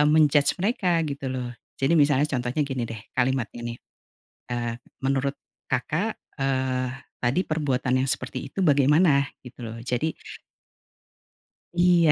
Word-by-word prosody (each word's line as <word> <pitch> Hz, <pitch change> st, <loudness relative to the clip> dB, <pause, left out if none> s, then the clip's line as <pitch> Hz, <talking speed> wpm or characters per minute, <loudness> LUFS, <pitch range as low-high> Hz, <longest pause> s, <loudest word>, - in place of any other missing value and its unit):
eee, 150 Hz, -, +5 dB
men-judge 150 Hz, -2 st, +4 dB
mereka 185 Hz, -4 st, +2 dB
gitu 140 Hz, -2 st, -4 dB
loh 125 Hz, -2 st, -3 dB, 0.3 s
jadi 135 Hz, +5 st, +3 dB
misalnya 145 Hz, 0 st, +4 dB
contohnya 130 Hz, +1 st, -1 dB
gini 130 Hz, -3 st, -2 dB
deh 115 Hz, -, -5 dB, 0.2 s
kalimatnya 125 Hz, -2 st, 0 dB
nih, 120 Hz, 0 st, -5 dB, 0.7 s
eee, 120 Hz, -1 st, -1 dB, 0.3 s
"Menurut 135 Hz, +1 st, +1 dB, 0.3 s
Kakak," 160 Hz, -, 0 dB, 0.2 s
eee, 130 Hz, -1 st, +1 dB, 0.3 s
"tadi 125 Hz, +9 st, +2 dB
perbuatan 130 Hz, -4 st, +1 dB
yang 135 Hz, -, -1 dB
seperti 130 Hz, 0 st, -3 dB
itu 195 Hz, -, -2 dB
bagaimana?" 145 Hz, 0 st, +4 dB
Gitu 125 Hz, 0 st, -12 dB
loh 115 Hz, 0 st, -6 dB
jadi 125 Hz, +6 st, 0 dB, 1.6 s
Iya 175 Hz, -3 st, +5 dB
135 Hz, 130 wpm, -26 LUFS, 125-150 Hz, 1.6 s, eee